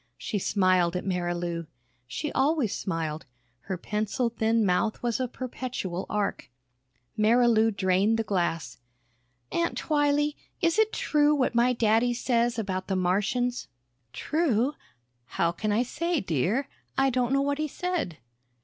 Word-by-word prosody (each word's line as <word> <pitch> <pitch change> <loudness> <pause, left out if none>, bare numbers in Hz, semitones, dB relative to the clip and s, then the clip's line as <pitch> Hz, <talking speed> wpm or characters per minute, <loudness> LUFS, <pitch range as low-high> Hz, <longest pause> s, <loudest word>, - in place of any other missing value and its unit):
She 205 - -3
smiled 185 -3 +2
at 180 - -3
Marilou. 175 -2 -2 0.4
She 295 - -4
always 275 -6 +1
smiled; 160 -4 -3 0.4
her 190 -2 -3
pencil 215 +6 -1
thin 225 0 +1
mouth 200 +5 0
was 240 0 0
a 255 - 0
perpetual 245 -7 -5
arc. 205 -9 -2 0.7
Marilou 225 0 +4
drained 195 +2 +2
the 225 - 0
glass. 170 - -2 0.7
"Aunt 340 0 0
Twylee 295 -1 +1 0.2
is 335 +4 +2
it 440 0 +4
true 300 0 +2
what 260 -4 +1
my 240 +1 +4
daddy 230 +1 +2
says 240 -1 +1
about 190 -4 -3
the 195 - 0
Martians?" 205 +7 0 0.4
"True? 285 - +1 0.6
How 170 - +3
can 210 +5 -2
I 220 +4 +2
say, 335 +6 -1
dear? 195 - 0 0.3
I 270 0 +3
don't 250 0 0
know 275 0 +3
what 285 +1 -1
he 310 - 0
said." 340 - -3
225 Hz, 140 wpm, -27 LUFS, 185-265 Hz, 0.7 s, Marilou